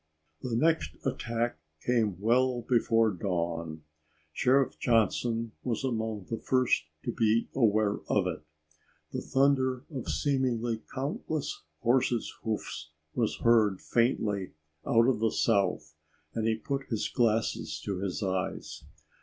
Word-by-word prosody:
The 125 -3 -2
next 160 +7 +2
attack 120 -6 -1 0.3
came 110 -7 +1
well 120 +3 +2
before 115 -2 +3
dawn. 85 -4 -3 0.5
Sheriff 135 +1 +2
Johnson 115 0 +1
was 125 0 -2
among 110 -5 -2
the 115 - -3
first 130 -10 +2 0.2
to - - 0
be 115 0 +2
aware 110 -4 +3
of 100 -3 +3
it. 90 - -3 0.7
The - - -3
thunder 130 -1 +2
of 130 -4 -5
seemingly 120 -5 0
countless 145 +2 -3 0.2
horses' 120 -1 +2
hoofs 90 -8 -4 0.2
was 115 -3 0
heard 110 -5 +4
faintly 105 -5 0 0.3
out 115 0 +5
of 130 -4 +2
the 115 0 +3
south 100 -8 +1 0.4
and 110 -1 -1
he 110 - +2
put 135 +4 -3
his 110 -3 -1
glasses 105 -9 0
to 100 -3 -2
his 100 +2 -2
eyes. 95 -1 -3
115 Hz, 125 wpm, -29 LUFS, 105-125 Hz, 0.7 s, out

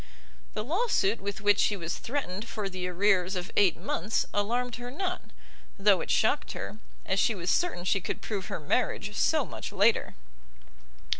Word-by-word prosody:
The 215 - -1
law 360 - 0
suit 205 - +2
with 200 +2 -4
which 205 -1 +4
she 205 - +3
was 170 -2 -4
threatened 230 -6 -3
for 210 -3 -3
the 185 -1 -4
arrears 185 0 +2
of 180 0 -4
eight 195 -5 +4
months, 205 +7 -1
alarmed 235 +4 0
her 245 0 -6
not, 360 +6 -3 0.6
though 200 -2 +4
it - - -6
shocked 250 +7 +2
her, 210 - -6 0.3
as 190 - +1
she 225 - +3
was 180 -1 -1
certain 350 - +1
she 190 +1 +1
could - - -3
prove 200 -4 -4
her - - -4
marriage 150 - -1
so - - +2
much - - -6
later. - - +2
205 Hz, 175 wpm, -29 LUFS, 185-235 Hz, 0.6 s, which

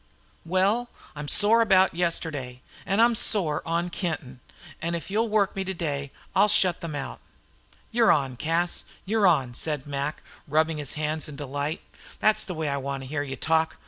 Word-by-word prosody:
"Well, 200 +7 +1 0.3
I'm 150 0 -6
sore 215 +8 +5
about 190 -4 +4
yesterday, 155 -7 -2 0.2
and 195 +3 +1
I'm 235 0 +5
sore 185 -9 +3
on 170 +1 -1
Kenton, 150 -9 -4 0.4
and 170 +1 -1
if 170 +3 -6
you'll 225 +2 +1
work 210 -2 +1
me 195 - -1
today 155 -7 -3 0.3
I'll - - +5
shut 185 -4 +4
them 165 -3 -5
out." 140 - -5 0.7
"You 235 0 +3
're - - +6
on, 135 -4 +1
Cas, 165 +6 0 0.2
you're 210 0 +3
on," 135 -8 +2
said 150 +1 -1
Mac, 140 +1 -4 0.2
rubbing 155 +1 +1
his 145 - -3
hands 155 0 -2
in 150 - -8
delight. 145 +2 -4 0.4
"Thet's 215 0 +3
the 180 - -5
way 160 -1 -2
I 140 -1 -1
want 135 0 -4
to 130 - -9
hear 145 0 -2
you 135 -2 -5
talk. 160 +4 +1
160 Hz, 180 wpm, -26 LUFS, 145-190 Hz, 0.7 s, re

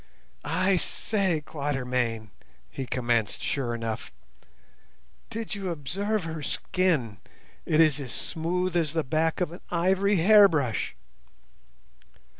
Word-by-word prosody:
"I 185 +1 +2
say, 185 -4 -1
Quatermain," 125 - -2 0.4
he 135 - -5
commenced 120 -4 0
sure 125 -4 -1
enough, 115 -2 -4 1.2
"did 225 +1 -4
you 195 -3 -3
observe 195 +7 -2
her 160 -1 -5
skin? 145 - 0 0.5
It 155 - +2
is 155 -3 +5
as 130 -4 -6
smooth 175 +2 -2
as 160 -4 +1
the 160 -1 +1
back 160 +5 0
of 175 - 0
an 175 - -10
ivory 190 +4 +2
hairbrush." 170 - +4
160 Hz, 110 wpm, -27 LUFS, 130-185 Hz, 1.2 s, is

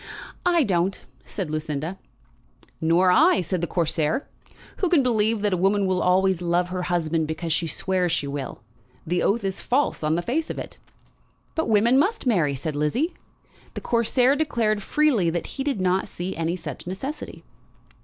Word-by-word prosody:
"I 345 -3 +4
don't," 190 -3 0 0.3
said 185 -7 -4
Lucinda. 155 +3 -3 0.8
"Nor 170 +3 +4
I," 320 - +5
said 175 0 -2
the 170 - -1
Corsair. 165 - 0 0.5
"Who 370 - 0
can 325 -6 +4
believe 225 -3 +1
that 205 -2 +1
a - - +1
woman 195 +2 +2
will 185 -1 +1
always 185 0 +2
love 175 +1 +1
her 180 0 -3
husband 165 -2 0
because 160 +1 -2
she 165 +1 0
swears 180 +1 0
she 160 - 0
will? 140 -4 -5 0.4
The 175 +2 0
oath 220 +3 +1
is 195 -1 -3
false 275 +4 0
on 155 +1 +1
the 175 - -1
face 310 - -1
of - - -4
it." - - -8 0.7
"But 320 -6 -1
women 230 +5 +4
must 420 +6 +1
marry," 170 - +2
said 150 +3 -4
Lizzie. 230 - 0 0.6
The - - -4
Corsair 245 +3 +2
declared 230 -8 0
freely 250 - +2
that 170 0 -2
he 270 - -5
did 275 -7 -1
not 185 +1 +1
see 180 +2 -5
any 165 +1 -1
such 180 - -8
necessity. 265 +12 -6
185 Hz, 175 wpm, -24 LUFS, 170-235 Hz, 0.8 s, I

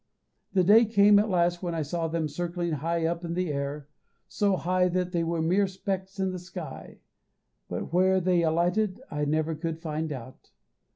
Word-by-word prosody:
The 185 -2 +4
day 215 +6 +7
came 205 -1 +5
at 215 +1 +1
last 175 -1 +1
when 175 -2 -3
I 160 - -1
saw 165 +3 -2
them 160 -1 -1
circling 175 +3 -3
high 165 +2 -1
up 170 +1 -1
in 170 0 -3
the 180 -4 -1
air, 140 +1 -4 0.4
so 200 -2 +1
high 180 +1 +1
that 180 0 -1
they 170 -2 0
were 165 -1 -1
mere 190 +5 +2
specks 190 0 -4
in 190 -1 0
the 185 - -5
sky, 175 -4 -9 0.7
but - - -5
where 190 +1 +4
they 180 -1 +2
alighted 175 +6 +1
I 150 0 -1
never 155 +2 0
could 160 +1 -4
find 160 -1 -4
out. 130 -1 -9
175 Hz, 185 wpm, -27 LUFS, 160-185 Hz, 0.7 s, day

